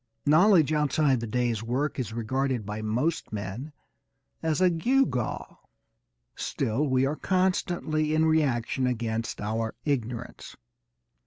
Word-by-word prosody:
Knowledge 160 Hz, 0 st, +5 dB
outside 150 Hz, -3 st, +2 dB
the 115 Hz, -, -4 dB
day's 120 Hz, -1 st, 0 dB
work 130 Hz, +6 st, -2 dB
is 120 Hz, -5 st, -3 dB
regarded 125 Hz, +1 st, -1 dB
by 105 Hz, +1 st, -4 dB
most 120 Hz, +10 st, -1 dB
men 105 Hz, +8 st, -5 dB, 0.7 s
as 160 Hz, 0 st, 0 dB
a 185 Hz, -1 st, +4 dB
gewgaw. 170 Hz, -, 0 dB, 0.8 s
Still 125 Hz, +7 st, -1 dB
we 130 Hz, 0 st, +2 dB
are 145 Hz, +3 st, -1 dB
constantly 175 Hz, -4 st, 0 dB
in 160 Hz, 0 st, +3 dB
reaction 135 Hz, -5 st, +1 dB
against 115 Hz, -2 st, -2 dB
our 110 Hz, +2 st, -2 dB
ignorance. 120 Hz, -4 st, -3 dB
130 Hz, 115 wpm, -27 LUFS, 115-155 Hz, 0.8 s, Knowledge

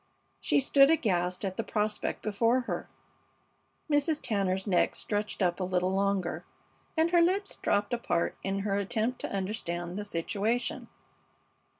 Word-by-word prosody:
She -, -, +2 dB
stood 275 Hz, 0 st, +5 dB
aghast 180 Hz, -, +1 dB
at 185 Hz, -1 st, -4 dB
the 225 Hz, -, -1 dB
prospect 210 Hz, -1 st, -2 dB
before 230 Hz, +4 st, +2 dB
her. -, -, -4 dB, 1.0 s
Mrs. 300 Hz, +1 st, +2 dB
Tanner's 190 Hz, -3 st, -1 dB
neck 185 Hz, -4 st, +2 dB
stretched 210 Hz, -1 st, -2 dB
up 175 Hz, 0 st, +1 dB
a -, -, -1 dB
little 180 Hz, 0 st, 0 dB
longer, 195 Hz, -2 st, 0 dB, 0.5 s
and 325 Hz, +1 st, +3 dB
her 345 Hz, -1 st, +5 dB
lips 390 Hz, +4 st, +1 dB
dropped 205 Hz, +2 st, 0 dB
apart 175 Hz, -8 st, 0 dB
in 195 Hz, 0 st, -2 dB
her 200 Hz, 0 st, 0 dB
attempt 220 Hz, +5 st, -1 dB
to -, -, -4 dB
understand 185 Hz, -2 st, -3 dB
the -, -, -3 dB
situation. 205 Hz, +6 st, -2 dB
205 Hz, 140 wpm, -29 LUFS, 185-240 Hz, 1.0 s, stood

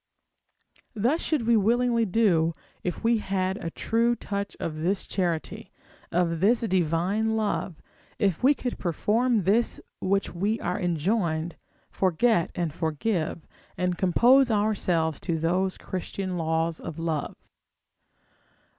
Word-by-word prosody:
Thus 245 Hz, +10 st, +1 dB
should 295 Hz, -8 st, 0 dB
we 235 Hz, 0 st, +4 dB
willingly 230 Hz, +2 st, +2 dB
do, 175 Hz, -6 st, +2 dB, 0.3 s
if 180 Hz, +3 st, -4 dB
we 230 Hz, 0 st, +3 dB
had 190 Hz, -1 st, -1 dB
a 165 Hz, -, -2 dB
true 230 Hz, +7 st, +1 dB
touch 200 Hz, -3 st, -5 dB
of 155 Hz, -2 st, -4 dB
this 185 Hz, +5 st, 0 dB
charity, 175 Hz, -4 st, -3 dB, 0.4 s
of 170 Hz, -1 st, +1 dB
this 220 Hz, +6 st, +3 dB
divine 190 Hz, +3 st, +1 dB
love, 205 Hz, -6 st, -2 dB, 0.3 s
if 195 Hz, -4 st, 0 dB
we 280 Hz, +3 st, +5 dB
could 250 Hz, -2 st, -4 dB
perform 215 Hz, -, +1 dB
this 215 Hz, +6 st, +2 dB, 0.2 s
which 195 Hz, +1 st, 0 dB
we 205 Hz, +6 st, -1 dB
are -, -, -2 dB
enjoined, 170 Hz, -1 st, 0 dB, 0.4 s
forget 190 Hz, +1 st, +2 dB
and 170 Hz, -4 st, -2 dB
forgive, 160 Hz, +1 st, -2 dB, 0.3 s
and 180 Hz, 0 st, 0 dB
compose 240 Hz, +9 st, +4 dB
ourselves 185 Hz, -8 st, +1 dB
to 170 Hz, -3 st, -2 dB
those 180 Hz, +4 st, 0 dB
Christian 185 Hz, 0 st, -4 dB
laws 160 Hz, -1 st, -1 dB
of 160 Hz, -, -7 dB
love. 165 Hz, -3 st, -2 dB
190 Hz, 125 wpm, -26 LUFS, 165-225 Hz, 0.4 s, we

